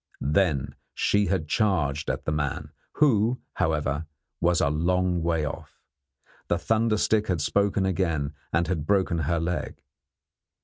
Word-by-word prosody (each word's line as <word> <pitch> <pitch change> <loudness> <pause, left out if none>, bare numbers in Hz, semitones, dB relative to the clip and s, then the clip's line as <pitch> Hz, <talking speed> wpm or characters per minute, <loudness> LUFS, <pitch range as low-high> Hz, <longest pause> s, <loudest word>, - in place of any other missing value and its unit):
Then 75 -7 +1 0.2
she 105 -1 +2
had 90 -5 -1
charged 75 -6 0
at - - -3
the - - 0
man, 75 -2 -2 0.2
who, 125 -4 +3
however, 75 -1 -1 0.3
was 85 0 +2
a 70 - +2
long 90 +3 +1
way 80 -2 0
off. 70 - -7 0.7
The 85 - +1
thunder 110 +4 +1
stick 110 0 +1
had 90 -3 0
spoken 100 +5 +1
again, 85 -6 -1 0.2
and 85 +2 +2
had 80 -5 -2
broken 95 -4 +2
her 85 +2 0
leg. 85 +2 -3
85 Hz, 140 wpm, -26 LUFS, 75-100 Hz, 0.7 s, who